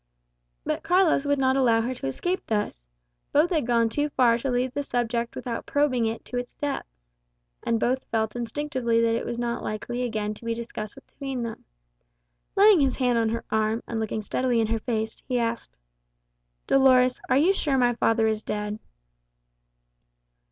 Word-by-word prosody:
But - - -2
Carlos 350 -5 +3
would 285 0 +2
not 265 -1 +2
allow 235 -4 +3
her 245 +3 -2
to 235 - -5
escape 355 - -2
thus. 205 - -2 0.4
Both 305 +5 +3
had 310 -8 +1
gone 235 -1 +3
too 290 +6 -1
far 245 -4 +4
to 270 - -2
leave 250 +1 0
the 285 - -1
subject 235 -3 -2
without 235 -2 -5
probing 260 -5 +2
it 225 +1 -4
to 250 - -5
its 245 0 -5
depths. - - -6 0.5
And 230 -1 0
both 255 +3 0
felt 220 -1 -1
instinctively 240 -1 -1
that 230 0 +3
it 230 - -2
was 235 - -3
not 235 0 -2
likely 240 +3 -4
again 215 -4 -2
to 215 - -14
be 230 0 -1
discussed 225 -2 -6
between 270 -2 -6
them. 230 -1 -6 0.9
Laying 400 -4 +7
his 270 -2 +2
hand 245 -3 +2
on 225 -1 +1
her 230 +1 -3
arm, 220 +1 +1
and 230 - -3
looking 220 0 -2
steadily 245 +2 0
in 225 - +3
her 225 +1 -1
face, 220 -1 -3
he 250 - 0
asked, 230 -1 -3 0.9
"Dolores, 255 -2 +4
are 260 - +4
you 340 +7 +4
sure 290 -8 0
my 245 -1 +3
father 225 -1 +2
is 220 -1 0
dead?" 210 0 -4
240 Hz, 180 wpm, -26 LUFS, 225-265 Hz, 0.9 s, Laying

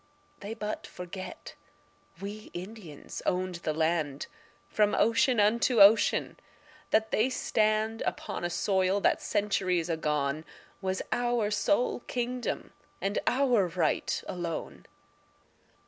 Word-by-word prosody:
They 205 +3 -6
but 215 -1 -4
forget 180 +1 -8 0.7
we 205 +2 -7
Indians 180 -5 -8
owned 185 -1 -1
the 155 - -1
land 155 -3 0 0.4
From 210 -1 +2
ocean 230 +2 +3
unto 225 +3 +3
ocean; 205 +2 +5 0.5
that 220 0 +2
they 225 +5 +2
stand 220 -2 +1
Upon - - -3
a 175 - 0
soil 190 +2 +1
that - - +2
centuries 185 -4 0
agone 150 -2 -1 0.4
Was 190 -1 -1
our 240 -3 +1
sole 245 +5 +1
kingdom 245 0 -3 0.3
and 200 +1 -1
our 245 -7 +3
right 170 -3 0
alone. 170 -2 -5
200 Hz, 110 wpm, -29 LUFS, 175-225 Hz, 0.7 s, ocean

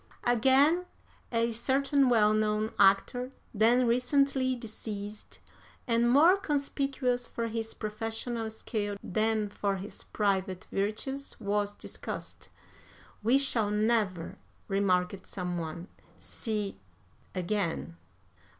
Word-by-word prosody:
"Again, 270 +9 +4 0.4
a 230 0 +1
certain 270 +3 +2
well 215 -3 +5
known 215 0 +1
actor, 205 +6 +4 0.2
then 235 +4 +4
recently 260 +2 +2
deceased, 215 -2 -7 0.5
and 235 0 +3
more 320 +9 +6
conspicuous 275 -6 -1
for 230 - -3
his 225 0 -4
professional 225 +1 -3
skill 210 -2 -3
than 215 +1 +1
for 200 0 -1
his 195 +2 -8
private 190 -3 -1
virtues, 220 +8 -3
was 205 0 -1
discussed. - - -7 0.7
'We 235 +5 +4
shall 240 -6 +1
never,' 210 -5 0 0.3
remarked 190 -1 +1
some 180 -2 -3
one, 170 +2 -5 0.3
'see 210 - -3 0.6
again.' 180 - -2
220 Hz, 100 wpm, -30 LUFS, 205-250 Hz, 0.7 s, more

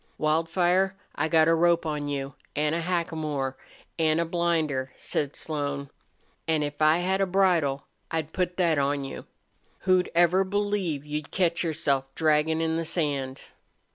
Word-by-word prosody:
"Wildfire, 175 +5 +2 0.2
I 155 - 0
got 160 -1 +4
a 165 - +5
rope 170 0 +3
on 150 -2 -2
you 140 -1 -3 0.2
an' 150 +1 +1
a 170 - 0
hackamore 155 -6 -2 0.4
an' 160 0 +3
a 170 - +1
blinder," 160 -6 0
said 145 -2 -2
Slone. 140 -3 -4 0.6
"An' 160 -2 +2
if 145 +1 -5
I 155 +1 +5
had 190 +2 0
a 195 - +2
bridle 175 -8 +2 0.2
I'd 160 -1 -3
put 180 -1 -1
that 170 -5 +2
on 140 0 0
you. 135 - -7 0.6
Who'd 185 -1 +3
ever 175 +2 +4
believe 195 -7 -1
you'd 150 0 -4
catch 170 -2 +1
yourself, 150 -5 0
draggin' 160 0 +2
in 160 0 0
the 165 - -1
sand?" 140 -5 -2
160 Hz, 155 wpm, -27 LUFS, 145-175 Hz, 0.6 s, a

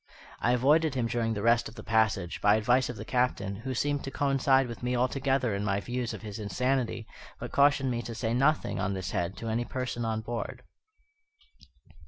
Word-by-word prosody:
I 120 - +2
avoided 145 +4 +3
him 125 -3 0
during 115 -1 -1
the 100 - -3
rest 115 0 +3
of 110 - -15
the 105 - -9
passage, 110 -6 +1
by 105 0 +5
advice 125 +4 +2
of 125 - -4
the - - -7
Captain, 115 -6 0
who 130 +4 -4
seemed 145 +2 0
to - - -3
coincide 135 -1 +2
with 115 - -8
me 125 +1 -1
altogether 130 -1 +1
in 100 +1 -2
my 100 -1 0
views 120 +2 -3
of - - -8
his 105 0 -6
insanity, 120 +1 -1 0.3
but - - -6
cautioned 140 -2 +3
me 120 -1 -1
to 115 -1 -7
say 115 0 -1
nothing 140 +5 +1
on 95 - -1
this 95 -2 -4
head 85 +3 -2
to 115 - -6
any 115 +2 0
person 125 -1 -4
on 110 -1 -1
board. 115 +1 -5
120 Hz, 205 wpm, -29 LUFS, 110-130 Hz, 0.3 s, by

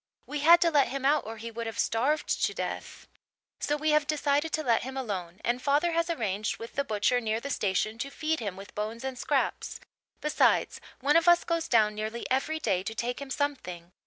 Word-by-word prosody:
We 295 - -4
had 335 +4 +7
to 335 - +4
let 285 -3 +4
him 270 0 -4
out 290 -3 +3
or 225 0 -6
he 230 +1 -7
would 230 0 -5
have 225 - -6
starved 270 +7 +1 0.2
to - - -2
death. - - -5 0.5
"So 295 - 0
we 310 +1 +1
have 300 -1 +3
decided 295 +1 +1
to 310 - 0
let 235 -5 +3
him 265 +2 -6
alone 190 -8 -4
and 245 +1 0
father 295 +5 +2
has 335 +1 0
arranged 215 - -1
with 230 - -9
the 280 - 0
butcher 245 +1 +1
near 220 -1 -1
the 280 +4 -5
station 215 +1 0
to 275 - -3
feed 315 +3 -1
him 200 -5 -4
with 195 +1 -11
bones 215 +3 -4
and 265 -1 -3
scraps. - - -1 0.4
Besides, 300 - +2 0.2
one 290 +4 +4
of 335 +1 +2
us 345 0 +6
goes 335 -1 -1
down 215 -3 +4
nearly 215 +2 -4
every 270 +5 +1
day 195 -10 +1
to 220 +4 -5
take 245 +3 -3
him 280 - -7
something. 180 - -3
260 Hz, 220 wpm, -28 LUFS, 220-295 Hz, 0.5 s, had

